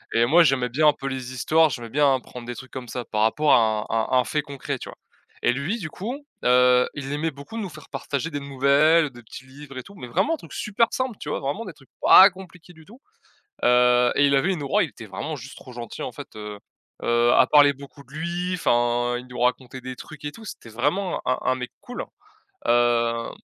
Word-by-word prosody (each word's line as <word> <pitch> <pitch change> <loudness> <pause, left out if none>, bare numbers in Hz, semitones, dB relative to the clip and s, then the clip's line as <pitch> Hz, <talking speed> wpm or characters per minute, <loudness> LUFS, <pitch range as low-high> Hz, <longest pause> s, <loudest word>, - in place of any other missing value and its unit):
et 115 - +4
moi 170 +6 +6
j'aimais 135 -4 +2
bien 150 +6 +3
un 150 - +6
peu 135 - -7
les 130 -1 -5
histoires. 155 +5 +3
J'aimais 120 -4 -6
bien 145 0 +3
apprendre 125 -2 -6
des 120 - -6
trucs 130 +1 -10
comme 130 -2 -7
ça 125 +1 -4
par 105 - -2
rapport 145 +7 +2
à 110 -2 +3
à 115 +3 +1
un 125 - +3
fait 150 - -1
concret, 140 -3 -5
tu - - -9
vois? - - -12 0.4
Et 120 - +3
lui 165 - -2
du 155 -4 -5
coup, 240 - -6 0.2
heu, 125 0 +5
il 140 -1 -6
aimait 160 +2 -1
beaucoup 140 +11 -10
nous 205 -4 -4
faire 155 -3 -13
partager 140 +3 -3
des 145 - -4
nouvelles, 140 +3 +3
des 120 -1 -14
petits 130 +4 -11
livres 135 +1 -13
et 130 - -4
tout, 200 - -15
mais 155 - -8
vraiment 295 - +1
des - - -15
trucs - - -13
supers 215 +2 +1
simples, 255 -4 -2
tu 150 - -6
vois? - - -2
Vraiment 145 +12 -3
des 185 - -8
trucs 135 - -22
pas 195 +2 +9
compliqués 180 -2 -14
du 160 -1 -17
tout, 235 - -17 0.6
heu, 125 0 +4
et 145 - +4
il 140 0 +3
avait 175 +8 +2
une 160 -5 -5
aura, 140 - +2
il - - -3
était 115 - -12
vraiment 105 +11 -5
juste 130 +2 -10
trop 130 - -12
gentil 120 -1 -8
en - - -4
fait, - - -9
heu, 105 -1 -7 0.4
heu, 120 0 +3
à 130 - +5
parler 145 0 +6
beaucoup 140 +1 -13
de 135 - -23
lui, 175 +3 -3
enfin, 120 -4 +1
il 125 +1 -9
nous 125 -1 -8
racontait 125 +1 -1
des 130 0 -7
trucs 150 +3 -11
et 145 - -3
tout. 225 - -13
C'était 115 - -9
vraiment 150 - -1
un 130 - +1
un - - +2
un - - +1
mec 125 -1 -6
cool, 245 - -6 0.6
heu 120 -1 +2
135 Hz, 240 wpm, -24 LUFS, 125-160 Hz, 0.6 s, pas